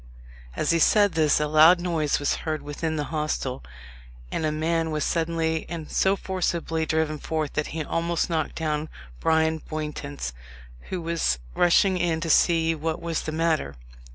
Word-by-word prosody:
As -, -, +1 dB
he 170 Hz, -, +2 dB
said 205 Hz, +5 st, +4 dB
this, 155 Hz, -3 st, +3 dB
a 150 Hz, -, +1 dB
loud 155 Hz, +4 st, +6 dB
noise 165 Hz, -4 st, 0 dB
was 145 Hz, -, 0 dB
heard 155 Hz, -1 st, -3 dB
within 155 Hz, +2 st, -3 dB
the 150 Hz, -, -1 dB
hostel, 150 Hz, -4 st, -2 dB, 0.7 s
and 155 Hz, -, -1 dB
a -, -, 0 dB
man 165 Hz, +1 st, 0 dB
was 155 Hz, -2 st, -1 dB
suddenly 165 Hz, -1 st, -1 dB
and 165 Hz, -3 st, -6 dB
so 195 Hz, +1 st, +3 dB
forcibly 170 Hz, -4 st, -2 dB
driven 155 Hz, -1 st, 0 dB
forth, 155 Hz, -2 st, -3 dB
that 150 Hz, -, -1 dB
he 160 Hz, 0 st, -4 dB
almost 170 Hz, +2 st, -1 dB
knocked 160 Hz, -3 st, -2 dB
down 155 Hz, -1 st, -2 dB, 0.3 s
Bryan 160 Hz, 0 st, +2 dB
Bowntance, 150 Hz, -, -5 dB, 0.6 s
who 180 Hz, -2 st, -3 dB
was 165 Hz, -, 0 dB, 0.2 s
rushing 180 Hz, +2 st, +3 dB
in 170 Hz, -2 st, 0 dB
to 165 Hz, 0 st, -1 dB
see 165 Hz, -1 st, +4 dB
what 160 Hz, 0 st, -3 dB
was 170 Hz, -1 st, -2 dB
the 155 Hz, -, -4 dB
matter. 160 Hz, -, 0 dB
160 Hz, 165 wpm, -25 LUFS, 155-170 Hz, 0.7 s, loud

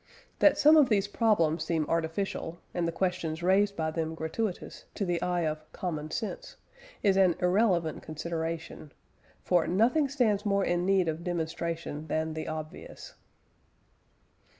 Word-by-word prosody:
That -, -, +5 dB
some 305 Hz, +2 st, +7 dB
of 290 Hz, -4 st, +5 dB
these 200 Hz, -3 st, +2 dB
problems 200 Hz, -8 st, +2 dB
seem 160 Hz, -3 st, 0 dB
artificial, 165 Hz, +1 st, -2 dB, 0.2 s
and 175 Hz, -1 st, 0 dB
the -, -, -1 dB
questions 175 Hz, -2 st, -2 dB
raised 200 Hz, +2 st, +3 dB
by 160 Hz, -1 st, -1 dB
them 160 Hz, 0 st, -3 dB
gratuitous, 175 Hz, +5 st, -4 dB
to 200 Hz, -, -1 dB
the 175 Hz, -2 st, -1 dB
eye 180 Hz, -1 st, 0 dB
of 155 Hz, 0 st, -4 dB
"common 155 Hz, -4 st, -4 dB
sense" -, -, -5 dB, 0.5 s
is 195 Hz, -2 st, +4 dB
an 185 Hz, -3 st, +4 dB
irrelevant 180 Hz, -3 st, +2 dB
consideration, 165 Hz, -1 st, -5 dB, 0.5 s
for 175 Hz, -3 st, +2 dB
"nothing 250 Hz, -, +2 dB
stands 225 Hz, -7 st, +1 dB
more 200 Hz, -1 st, +1 dB
in 175 Hz, +1 st, 0 dB
need 190 Hz, -3 st, +3 dB
of 160 Hz, +1 st, -3 dB
demonstration 165 Hz, -2 st, -3 dB
than 160 Hz, +1 st, -1 dB
the 155 Hz, 0 st, -5 dB
obvious." 155 Hz, -1 st, -7 dB
175 Hz, 145 wpm, -29 LUFS, 160-200 Hz, 0.5 s, some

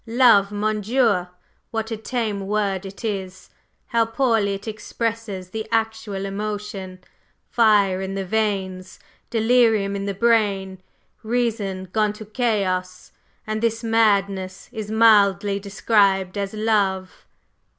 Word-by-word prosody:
Love! 225 Hz, -4 st, +5 dB
mon 210 Hz, +1 st, -1 dB
Dieu! 220 Hz, -5 st, +2 dB, 0.4 s
what 225 Hz, 0 st, -3 dB
a -, -, -1 dB
tame 215 Hz, -3 st, -3 dB
word 200 Hz, -2 st, -1 dB
it 195 Hz, +4 st, -9 dB
is! 190 Hz, -3 st, -5 dB, 0.3 s
How 230 Hz, -1 st, +2 dB
poorly 225 Hz, -3 st, +1 dB
it 200 Hz, +3 st, -10 dB
expresses 215 Hz, -3 st, -4 dB
the 220 Hz, 0 st, -5 dB
actual 220 Hz, -3 st, -1 dB
emotion! 200 Hz, -2 st, -5 dB, 0.5 s
Fire 205 Hz, -5 st, +3 dB
in 190 Hz, 0 st, -4 dB
the 195 Hz, -1 st, -3 dB
veins 190 Hz, -3 st, -2 dB, 0.3 s
delirium 225 Hz, -3 st, +3 dB
in 200 Hz, 0 st, -3 dB
the 200 Hz, -1 st, -3 dB
brain 200 Hz, -4 st, +1 dB, 0.4 s
reason 220 Hz, -5 st, -2 dB
gone 215 Hz, -1 st, +1 dB
to 215 Hz, +1 st, -10 dB
chaos! 195 Hz, -6 st, -2 dB, 0.3 s
And 215 Hz, 0 st, -3 dB
this 230 Hz, 0 st, 0 dB
madness 200 Hz, -4 st, +1 dB
is 215 Hz, -1 st, -6 dB
mildly 205 Hz, -3 st, +4 dB
described 200 Hz, -2 st, +1 dB
as 200 Hz, +1 st, -3 dB
'love? 200 Hz, -4 st, -1 dB
210 Hz, 120 wpm, -22 LUFS, 195-225 Hz, 0.5 s, Love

